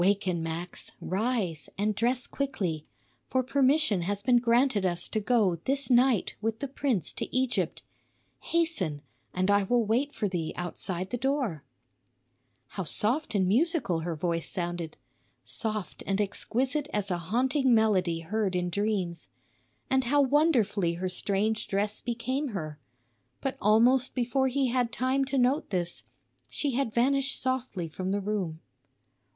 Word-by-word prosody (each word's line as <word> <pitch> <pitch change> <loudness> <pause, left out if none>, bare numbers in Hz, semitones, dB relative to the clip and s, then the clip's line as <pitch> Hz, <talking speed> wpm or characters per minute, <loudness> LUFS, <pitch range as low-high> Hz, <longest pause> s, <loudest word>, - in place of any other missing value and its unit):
"Waken, 190 -3 +1
Max, 165 +2 -4
rise 190 - -1
and 210 +2 +1
dress 245 +4 0
quickly; 185 - -3 0.4
for 260 0 +1
permission 270 - +2
has 200 +3 -2
been 250 -2 +4
granted 235 -2 +2
us 175 -1 0
to 215 - -1
go 210 -5 +2
this 275 0 +1
night 245 -3 +4
with 225 0 -1
the 280 - -4
prince 260 - -1
to - - -4
Egypt. 255 -1 0 0.6
Hasten, 205 - 0 0.3
and 185 +2 +1
I 205 0 +5
will 235 +4 +2
wait 250 +7 +1
for 215 - -2
thee 175 -4 -3
outside 175 +1 -4
the 245 - -2
door." 260 - -1 1.1
How 190 - -4
soft 220 - +2
and 190 -2 +2
musical 250 - +2
her 165 0 -3
voice 165 +1 -2
sounded! 175 -2 -4 0.5
Soft 215 -3 -3
and 195 0 0
exquisite 255 +8 0
as 205 -2 -1
a 175 - 0
haunting 255 - +1
melody 185 -7 +2
heard 195 +2 -1
in 180 0 -1
dreams. 195 -4 -1 0.6
And 265 -1 +2
how 290 +4 +3
wonderfully 245 - +2
her 185 +2 -2
strange 205 +4 0
dress 205 +1 -1
became 255 +4 -2
her! 155 -3 -6 0.6
But 270 - -2
almost 240 +5 +4
before 260 +2 +1
he 265 0 +1
had 245 -1 +1
time 260 +3 +1
to 270 +1 -2
note 260 +4 +2
this, 175 -3 -2 0.5
she 290 - -1
had 255 -2 0
vanished 275 +4 +1
softly 255 -9 -2
from 185 +4 -4
the 200 +1 0
room. 190 -6 -3
215 Hz, 145 wpm, -28 LUFS, 185-260 Hz, 1.1 s, I